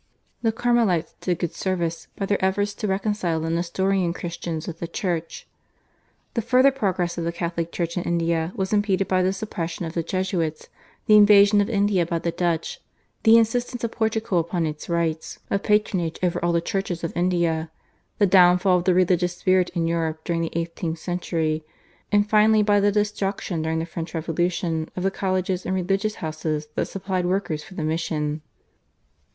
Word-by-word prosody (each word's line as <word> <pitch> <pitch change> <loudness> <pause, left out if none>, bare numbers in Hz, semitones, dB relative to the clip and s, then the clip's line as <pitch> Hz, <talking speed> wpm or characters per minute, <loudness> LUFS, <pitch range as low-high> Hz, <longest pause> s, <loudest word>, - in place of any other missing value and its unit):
The 225 -1 +2
Carmelites 225 -8 +1
did 180 -2 0
good 175 -2 -3
service 170 -3 -2
by 195 - -2
their 200 -1 0
efforts 205 +2 +1
to 210 - -4
reconcile 190 -4 0
the 165 +1 -2
Nestorian 180 +1 0
Christians 170 -2 -5
with 170 -1 -7
the 170 - -4
Church. 170 -3 -3 0.9
The 230 - 0
further 255 +4 +4
progress 185 -9 -1
of - - -2
the 170 - -1
Catholic 170 -1 -3
Church 170 -1 -3
in 180 - 0
India 170 -1 0
was 190 -1 -2
impeded 200 -2 +1
by 185 -1 +2
the 185 +1 +2
suppression 180 -4 -4
of 160 - -6
the 170 - 0
Jesuits, 175 -3 -2 0.4
the 215 - +6
invasion 205 0 +7
of 200 - -1
India 200 -4 +2
by 170 - -1
the 170 +1 -2
Dutch, 170 -2 -2 0.4
the 225 0 +7
insistence 240 +2 0
of 230 - -1
Portugal 220 -4 0
upon 170 0 -1
its 150 +1 -5
rights 165 -2 -1
of 200 - +1
patronage 200 -6 +1
over 175 -1 0
all 175 - +2
the 170 0 +2
churches 180 -1 -3
of 165 - -3
India, 170 -2 0 0.5
the 205 - +4
downfall 180 0 +5
of 175 - -6
the 185 - +3
religious 180 -1 +2
spirit 185 -1 +2
in 170 -1 +1
Europe 160 -1 -1
during 170 -1 -1
the 165 - -1
eighteenth 165 0 -3
century, 160 -2 -2 0.5
and 205 0 +3
finally 215 0 +5
by 205 0 +3
the 205 +1 +3
destruction 200 -4 -1
during 160 +1 -1
the 160 - -1
French 170 0 -6
Revolution 165 0 -1
of 180 - -3
the 195 - +1
colleges 185 -1 -1
and 185 - -1
religious 195 +3 0
houses 155 -1 -3
that - - -1
supplied 185 -2 -2
workers 180 -5 -1
for 185 - -13
the 160 - -3
mission. 155 -1 -2
180 Hz, 180 wpm, -24 LUFS, 165-200 Hz, 0.9 s, invasion